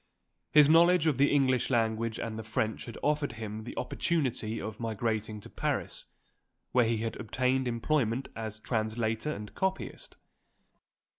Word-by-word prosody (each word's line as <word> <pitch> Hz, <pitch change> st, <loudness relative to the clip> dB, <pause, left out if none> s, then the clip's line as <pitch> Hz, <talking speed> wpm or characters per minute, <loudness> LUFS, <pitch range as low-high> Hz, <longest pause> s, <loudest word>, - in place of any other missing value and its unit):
His 150 Hz, -2 st, +7 dB
knowledge 170 Hz, +1 st, +6 dB
of 150 Hz, -5 st, +2 dB
the 140 Hz, -, +5 dB
English 130 Hz, -4 st, +3 dB
language 115 Hz, -2 st, 0 dB
and 110 Hz, -1 st, -4 dB
the -, -, -5 dB
French 110 Hz, 0 st, -2 dB
had 115 Hz, -, -8 dB
offered 145 Hz, -3 st, +1 dB
him 110 Hz, -1 st, -6 dB
the -, -, -8 dB
opportunity 125 Hz, -9 st, -1 dB
of 110 Hz, +1 st, -6 dB
migrating 110 Hz, -1 st, -2 dB
to -, -, -10 dB
Paris, -, -, -2 dB, 0.7 s
where 125 Hz, -2 st, +4 dB
he 115 Hz, 0 st, +1 dB
had 115 Hz, +1 st, -3 dB
obtained 130 Hz, +3 st, 0 dB
employment 120 Hz, 0 st, 0 dB
as 110 Hz, -1 st, -5 dB
translator 110 Hz, +3 st, -1 dB
and 105 Hz, -7 st, -7 dB
copyist. 190 Hz, 0 st, -3 dB
115 Hz, 145 wpm, -30 LUFS, 110-135 Hz, 0.7 s, His